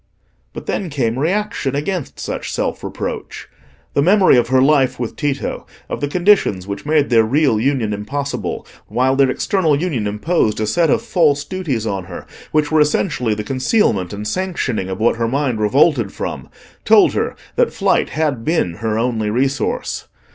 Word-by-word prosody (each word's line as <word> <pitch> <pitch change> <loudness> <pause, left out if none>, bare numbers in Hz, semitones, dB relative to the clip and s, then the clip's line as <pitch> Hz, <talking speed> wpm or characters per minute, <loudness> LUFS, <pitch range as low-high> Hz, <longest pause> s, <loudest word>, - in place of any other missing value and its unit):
But - - -8
then 190 - -2
came 125 -4 -1
reaction 180 - -1
against 160 +2 -3
such - - -4
self - - -2
reproach. - - -5 0.5
The - - +2
memory 190 +3 +5
of 120 -1 +3
her 130 +1 +3
life 135 -2 +3
with 120 -3 -4
Tito, 140 -2 -3 0.2
of - - -4
the 145 - 0
conditions 175 - +2
which 100 +8 -6
made 150 -3 +2
their 115 -2 +5
real 130 -1 +2
union 120 -4 0
impossible, 140 +8 -4 0.2
while 130 +5 +1
their 135 -1 +4
external 160 0 +1
union 145 -12 -1
imposed 105 +1 0
a 110 - 0
set 165 +9 +2
of - - +2
false 155 -10 +2
duties 145 - -3
on 100 -4 -3
her - - -9 0.3
which 155 -1 +1
were 155 -1 +4
essentially 135 - +1
the 105 - -4
concealment 130 - +1
and 105 +1 -5
sanctioning 165 - -2
of 95 - -4
what 115 +1 +2
her 115 0 0
mind 130 -2 -1
revolted 120 - +3
from, - - -6 0.3
told - - +5
her - - -1 0.2
that - - +2
flight - - +1
had 145 -6 -1
been 135 - 0
her 110 0 -2
only 115 -2 0
resource. 130 +3 -1
135 Hz, 170 wpm, -18 LUFS, 110-155 Hz, 0.5 s, memory